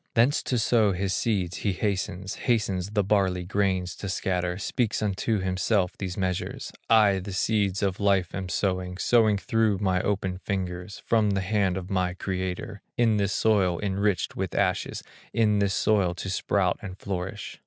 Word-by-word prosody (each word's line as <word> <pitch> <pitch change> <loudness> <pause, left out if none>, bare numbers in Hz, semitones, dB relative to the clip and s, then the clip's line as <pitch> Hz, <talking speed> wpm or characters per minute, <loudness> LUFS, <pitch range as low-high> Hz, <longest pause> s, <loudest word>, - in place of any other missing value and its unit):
Thence 125 +5 +4
to 125 - -1
sow 110 -2 +3
his 95 +1 -1
seeds 95 -6 0
he 100 - -1
hastens, 95 -1 -2
Hastes 100 -6 0
the 105 -1 +1
barley 95 -3 +1
grains 95 -2 0
to 100 - -5
scatter, 90 -1 -1
Speaks 110 +3 -1
unto 105 +2 0
himself 95 +1 0
these 95 -2 -5
measures: 95 -2 -3 0.2
"I 105 -4 +5
the 95 +2 -7
seeds 100 -1 +1
of 95 -1 0
life 100 -3 +2
am 95 -1 -4
sowing, 90 -1 -1
Sowing 110 0 +3
through 110 -2 +1
my 95 -2 +1
open 95 -2 -1
fingers, 90 0 -4
From 110 -2 +3
the 100 -1 0
hand 95 -1 +1
of 95 +1 -6
my 90 -2 0
Creator, 95 +2 -4 0.2
In 115 -3 +3
this 100 -1 +1
soil 95 -6 +2
enriched 100 -2 0
with - - -3
ashes, - - 0 0.3
In 105 -2 +3
this 100 -1 +1
soil 95 -5 +2
to 95 +1 -4
sprout 95 -1 +1
and 95 -4 -7
flourish. 95 +1 -5
95 Hz, 165 wpm, -26 LUFS, 90-105 Hz, 0.3 s, I